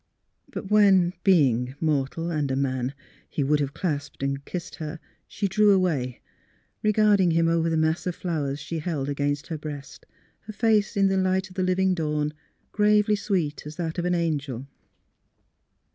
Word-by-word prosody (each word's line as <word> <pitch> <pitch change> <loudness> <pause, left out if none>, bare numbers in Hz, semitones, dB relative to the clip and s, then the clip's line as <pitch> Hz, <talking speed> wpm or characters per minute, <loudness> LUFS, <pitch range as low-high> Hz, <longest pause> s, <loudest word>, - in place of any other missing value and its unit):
But 195 - -7
when 195 -4 +5
(being 130 - +3
mortal 155 +2 -1
and 150 -4 -1
a 130 - 0
man) 130 -1 -1 0.3
he 145 - -1
would 150 +2 +2
have 140 -1 -2
clasped 145 -6 -3
and 140 0 -2
kissed 180 0 -6
her, 155 +1 -6 0.3
she 205 - -2
drew 210 +3 +3
away, 155 -10 +1 0.6
regarding 210 -3 +4
him 165 0 +3
over 165 0 +2
the 165 - +1
mass 160 +3 +1
of 180 - -2
flowers 150 -5 -2
she 160 +3 -4
held 150 -4 -2
against 145 +1 -1
her 160 -3 -5
breast, 145 -2 -8 0.4
her 215 - -6
face 215 -2 +2
in 195 0 +4
the 190 0 +1
light 190 0 +1
of 185 - -15
the 185 - -1
living 185 +1 +2
dawn 150 -3 -1 0.4
gravely 210 0 +3
sweet 175 -9 -2
as 150 - -8
that 165 0 -3
of 175 - -1
an 180 0 +2
angel. 145 -7 -2
165 Hz, 170 wpm, -25 LUFS, 145-190 Hz, 0.6 s, when